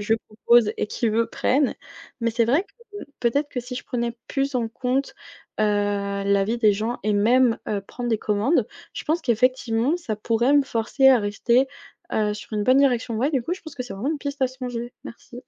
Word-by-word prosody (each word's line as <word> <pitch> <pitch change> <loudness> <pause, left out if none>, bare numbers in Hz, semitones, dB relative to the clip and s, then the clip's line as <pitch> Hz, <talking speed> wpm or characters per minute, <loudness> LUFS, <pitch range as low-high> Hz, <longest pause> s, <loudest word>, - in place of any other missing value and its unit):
je 220 +2 +2
propose 220 0 +3
et - - -1
qui 230 - -1
veut 225 +2 +1
prenne, 275 +1 +1 0.5
mais 230 0 +1
c'est 230 0 +2
vrai 280 - +2
que, 430 -2 -14
hem, - - -7 0.2
peut-être 280 +5 +1
que 250 - -4
si 250 +1 -8
je - - -6
prenais 235 -1 -3
plus 275 -1 -1
en 235 -2 0
compte, 255 +3 -2 0.5
heu, - - +3
l'avis 200 +1 0
des 215 -3 +5
gens 220 +4 -2
et 215 - +2
même, 230 +3 +3
heu, 205 -2 -1
prendre 240 +5 -6
des 220 - +2
commandes, 215 +10 +1 0.3
je - - -7
pense 325 +3 0
qu'effectivement 250 +3 +1
ça 230 -12 -4
pourrait 230 +4 +1
me 290 -1 +5
forcer 265 +2 +1
à 255 -2 +6
rester, 235 +6 +1 0.4
heu, 210 -1 +1
sur 210 - -11
une 210 - 0
bonne 255 +3 +5
direction. 250 -4 +2
Ouais, 255 +7 +1
du 270 - +1
coup, 330 - -3
je - - -13
pense 315 -3 -11
que 250 - -4
c'est 245 - -8
vraiment 245 +10 -2
une 310 - -2
piste 280 -1 -4
à 255 - +3
songer, 245 -2 -6
merci. 240 +1 -11
240 Hz, 215 wpm, -23 LUFS, 215-265 Hz, 0.5 s, à